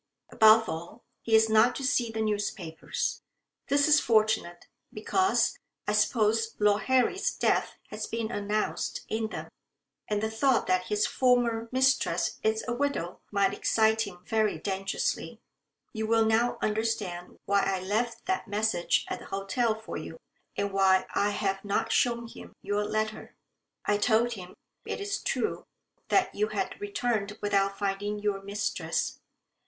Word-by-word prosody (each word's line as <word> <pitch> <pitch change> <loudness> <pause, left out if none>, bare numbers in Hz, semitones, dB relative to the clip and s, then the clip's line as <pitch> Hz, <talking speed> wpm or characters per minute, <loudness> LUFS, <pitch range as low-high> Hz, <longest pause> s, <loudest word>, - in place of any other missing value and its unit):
Above 220 +1 +6
all, 170 +8 -7 0.2
he 225 - +2
is 220 0 +6
not 220 +3 +4
to 275 - -5
see 260 -3 +1
the 220 0 -2
newspapers. 205 -6 -3 0.5
That 285 +1 +3
is 300 0 +6
fortunate, 215 -7 +1 0.3
because, 375 - +1 0.3
I - - +2
suppose, 225 -1 +2
Lord 210 0 +3
Harry's 260 +9 +2
death - - +1 0.2
has 215 0 -4
been 230 0 -3
announced 210 0 -2
in 220 0 -1
them, - - -7 0.6
and 210 -1 0
the 220 - -1
thought 255 +3 +2
that 185 0 +1
his 210 0 +1
former 240 -3 +1
mistress 260 +1 +1
is 220 0 0
a 240 - -1
widow 245 -10 -2
might 200 -1 +2
excite 220 0 +2
him 180 -2 -11
very 220 -1 +1
dangerously. 195 0 -3 0.5
You 220 -1 -3
will 225 0 +3
now 225 +2 +2
understand 210 -5 -2
why 200 0 +3
I 195 -1 0
left 215 +6 -2
that 375 -9 -1
message 205 -4 +1
at - - -4
the - - -12
hotel 205 +4 -1
for 220 0 -7
you, - - -8 0.4
and 200 -1 -2
why 190 -1 +4
I 205 - +2
have 195 -1 -2
not 205 -1 -1
shown 235 -1 +2
him - - -12
your 205 0 0
letter. 215 +1 -3 0.5
I 205 - +2
told 235 +2 +2
him, 185 -4 -10 0.3
it - - -4
is 405 0 -3
true, - - -1 0.4
that 370 -1 +2
you 425 - 0
had - - -4
returned 240 - -2
without 195 -1 +1
finding 205 +1 -2
your 205 -1 -1
mistress. 200 +2 -2
220 Hz, 150 wpm, -28 LUFS, 200-235 Hz, 0.6 s, Above